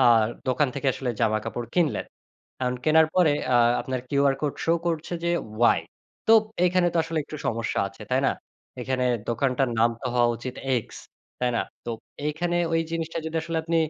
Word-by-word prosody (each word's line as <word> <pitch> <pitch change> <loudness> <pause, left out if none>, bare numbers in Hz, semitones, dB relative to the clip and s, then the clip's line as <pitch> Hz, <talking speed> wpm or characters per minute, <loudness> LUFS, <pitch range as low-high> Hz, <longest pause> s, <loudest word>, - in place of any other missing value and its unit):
আ - - +5 0.5
দোকান 135 +3 +2
থেকে 140 0 -3
আসলে 125 -2 -3
জামাকাপড় 115 +1 0
কিনলেন। 155 - +1 0.5
এখন 125 0 0
কেনার 160 0 +6
পরে 175 -5 +5 0.2
আ - - +4 0.3
আপনার 130 -1 -3
QR 140 -1 +3
Code 150 -2 -1
show 165 +1 +3
করছে 165 0 -2
যে 170 - +2 0.3
ওয়াই। 120 - +5 0.5
তোপ 225 -1 +7 0.2
এখানে 180 0 +3
তো - - +1
আসলে 165 0 -3
একটু 155 - -8
সমস্যা 115 0 -1
আছে, 100 +2 -13
তাই 130 +1 +3
না? - - +3 0.5
এখানে 130 0 -1 0.2
দোকানটার 130 +2 +1
নাম 115 +1 +5
তো 130 - -4
হওয়া 120 -1 +4
উচিত 125 +2 -6 0.2
এক্স, 115 - -5 0.4
তাই 125 - +2
না? - - +2 0.2
তো 120 - -3 0.4
এইখানে 170 +3 -1 0.2
ওই 165 - +3
জিনিসটা 165 0 -3
যদি 160 - -3
আসলে 165 0 -2
আপনি 165 0 0
140 Hz, 180 wpm, -25 LUFS, 125-165 Hz, 0.5 s, তোপ